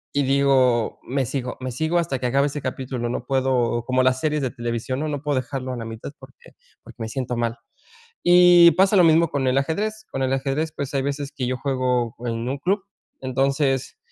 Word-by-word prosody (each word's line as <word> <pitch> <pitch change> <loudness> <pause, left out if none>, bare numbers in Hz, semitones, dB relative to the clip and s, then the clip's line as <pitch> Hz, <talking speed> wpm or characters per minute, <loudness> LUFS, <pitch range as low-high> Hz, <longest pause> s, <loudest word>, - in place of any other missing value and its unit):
y 145 - +3
digo: 130 -4 +2
"Me 135 +1 -1
sigo, 125 +1 -4
me 130 0 -4
sigo 160 +7 -1
hasta 135 -6 -2
que 125 - -1
acabe 140 +3 +2
ese 145 0 -5
capítulo", 130 -2 -4
no 120 0 -4
puedo 130 -3 0
como 130 0 +2
las 130 0 +2
series 150 -1 0
de 125 - -1
televisión, 120 +2 -3
¿no?, 155 - -2
no 145 -2 -3
puedo 145 -3 0
dejarlo 130 0 -5
a - - -5
la 115 - -6
mitad 115 +4 -7
porque 130 0 -16 0.3
porque - - -14
me 110 - -3
siento 125 -1 -3
mal, 115 0 -1 0.7
y 175 -1 +7
pasa 195 +2 +3
lo 180 - +6
mismo 165 0 +4
con 135 -2 -1
el 130 +1 +2
ajedrez, 215 +9 -2
con 135 - -3
el 130 +1 0
ajedrez, 140 +4 -1
pues, 140 0 -5
hay 135 - +2
veces 140 0 -3
que 125 -2 -3
yo 130 - -1
juego 125 -4 -1
en 115 +1 -3
un 140 - -2
club, 190 +5 0 0.4
entonces, 135 +1 0
135 Hz, 215 wpm, -23 LUFS, 125-145 Hz, 0.7 s, y